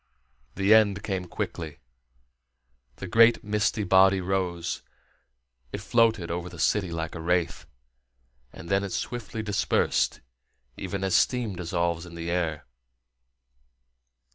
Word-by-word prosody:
The 100 +2 +4
end 105 -3 +4
came 95 -3 -3
quickly. 80 -3 -5 1.2
The - - -7
great 115 +5 +5
misty 105 0 0
body 95 0 +5
rose; 90 -2 -2 0.9
it - - -4
floated 110 -5 +2
over 90 +1 -4
the 90 - -11
city 95 +2 +1
like 80 -1 -4
a 80 - -6
wraith, 85 0 -1 0.8
and 95 +2 -11
then 95 +2 +1
it 100 - -4
swiftly 115 -2 -4
dispersed, 105 -2 0 0.5
even 95 0 -4
as 95 -2 0
steam 120 -6 +2
dissolves 85 -1 -2
in 85 - -11
the 85 0 -4
air. 80 -4 -1
95 Hz, 120 wpm, -26 LUFS, 85-105 Hz, 1.2 s, great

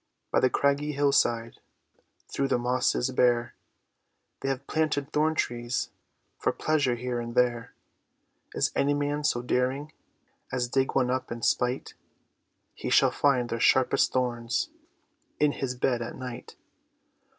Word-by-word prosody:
By - - +3
the 130 - +3
craggy 140 +2 +1
hill 140 0 +2
side, 115 -3 +1 0.7
Through 140 - -1
the - - +2
mosses 125 +1 0
bare, 120 -2 +2 0.9
They 135 - -2
have 135 0 -3
planted 155 -2 -1
thorn 155 +1 +2
trees 120 -3 -2 0.5
For - - +1
pleasure 145 -5 +1
here 120 0 -3
and 120 0 -6
there. 120 -1 +1 0.8
Is - - +1
any 145 +1 +2
man 145 +1 -1
so 120 -5 +1
daring 130 +4 -1 0.6
As 125 -1 -1
dig 135 +2 0
one 125 -2 +2
up 130 -1 -2
in 115 0 -5
spite, 125 +1 0 0.8
He - - -5
shall - - +5
find 130 -4 +2
their 115 - -2
sharpest 130 +2 +3
thorns 120 -2 -1 0.7
In 150 -1 +4
his 130 -3 -3
bed 125 -1 0
at 115 - -5
night. 125 -2 -8
125 Hz, 140 wpm, -27 LUFS, 120-140 Hz, 0.9 s, shall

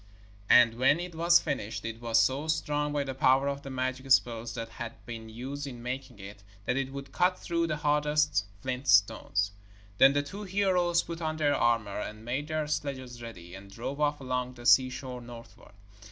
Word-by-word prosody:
And 120 -1 +6
when 140 +5 +4
it 175 0 -6
was 170 +2 +5
finished, 110 -5 -4
it 115 0 -5
was 115 -1 +2
so 135 +6 +1
strong, 150 -2 0
by 145 -1 0
the 135 -1 -4
power 135 0 +3
of 140 0 -2
the 135 - -8
magic 130 0 -3
spells 115 -3 +2
that 115 -1 -5
had 115 0 -7
been 115 -1 -7
used 135 +6 -6
in 120 -3 -8
making 125 -2 -5
it, 100 +1 -10 0.2
that 125 - 0
it 135 0 -2
would 140 0 -8
cut 180 +5 +2
through 170 -2 -1
the 155 -2 -2
hardest 150 -4 +1 0.2
flint 130 +1 -4
stones. 100 -2 +3 0.5
Then 135 +1 +7
the 145 0 +1
two 195 +8 -8
heroes 185 -3 +1
put 170 0 -7
on 155 -1 -2
their 145 -2 +2
armour 115 -4 +1
and 110 +1 -7
made 135 +5 -2
their 155 -1 -1
sledges 130 -5 -4
ready, 90 -7 -10
and 100 +1 -11
drove 120 +8 -5
off 150 0 +1
along 125 -1 -3
the 120 -1 -12
seashore 130 0 +3
northward. 120 -3 -13
130 Hz, 195 wpm, -29 LUFS, 115-150 Hz, 0.5 s, Then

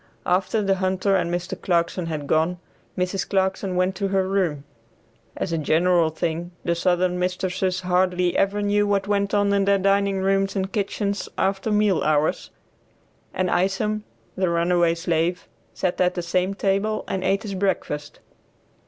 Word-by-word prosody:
After 190 +4 +1
the 195 -1 +1
hunter 190 +1 +1
and 170 -2 0
Mr. 175 0 -4
Clarkson 170 0 0
had 155 -3 -4
gone, 160 +4 +1 0.4
Mrs. 180 +1 -1
Clarkson 190 -1 0
went 185 +1 +1
to 200 - -1
her 190 -1 +1
room 180 -7 0 0.7
(as 170 - -2
a 165 - 0
general 170 +2 +3
thing 165 +2 -3 0.2
the 170 - +2
southern 180 +1 +1
mistresses 185 0 -1
hardly 180 0 +1
ever 205 +1 +1
knew 205 0 +2
what 200 -1 0
went 200 0 0
on 205 0 +2
in 200 -1 +2
their 200 0 +4
dining 195 0 +2
rooms 195 +1 +1
and 190 0 -2
kitchens 200 0 -2
after 195 +2 0
meal 210 -3 +2
hours), 150 0 +1 0.8
and 185 0 -1
Isom, 210 +3 0 0.3
the 185 -1 +1
runaway 170 0 +2
slave, 170 +1 -1 0.3
sat 180 0 -1
at 180 0 +2
the 175 - -3
same 185 +3 0
table 200 +2 0
and 190 -1 -2
ate 195 +1 +1
his 205 -3 -5
breakfast. 165 -6 -2
185 Hz, 160 wpm, -23 LUFS, 175-195 Hz, 0.8 s, their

